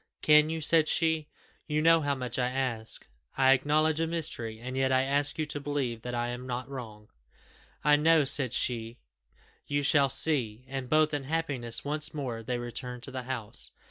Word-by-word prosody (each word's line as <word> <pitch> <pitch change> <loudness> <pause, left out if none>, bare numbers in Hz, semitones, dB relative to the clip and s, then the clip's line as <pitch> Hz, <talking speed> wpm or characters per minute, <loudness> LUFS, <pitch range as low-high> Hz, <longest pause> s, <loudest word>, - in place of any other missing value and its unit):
"Can 150 0 +6
you?" 160 0 -3
said 160 0 +4
she; 160 -2 +1 0.4
"you 150 0 0
know 165 +1 +5
how 145 -1 0
much 125 -1 -3
I 125 0 +1
ask. 125 -4 -2 0.3
I 135 -1 +5
acknowledge 155 +3 +1
a 165 - 0
mystery, 130 -9 -3
and 130 +2 -6
yet 130 0 +1
I 130 0 +3
ask 145 +2 0
you 155 - -1
to 150 -1 -3
believe 135 -5 -3
that 125 +1 -5
I 120 0 -1
am 125 +1 -6
not 125 0 -4
wrong." 110 -6 -9 0.7
"I 150 0 +5
know," 160 +1 +4
said 135 -3 +4
she; 115 -2 -1 0.7
"you 145 0 -1
shall 140 -1 +4
see." 125 -5 +2
And 130 -1 -5
both 155 +1 +3
in 145 -2 -3
happiness 140 -7 -2
once 150 +1 -2
more, 125 -6 -4
they 120 +2 -3
returned 120 +1 -6
to 135 - -6
the 130 0 -4
house. 115 -5 -5
135 Hz, 190 wpm, -29 LUFS, 125-150 Hz, 0.7 s, Can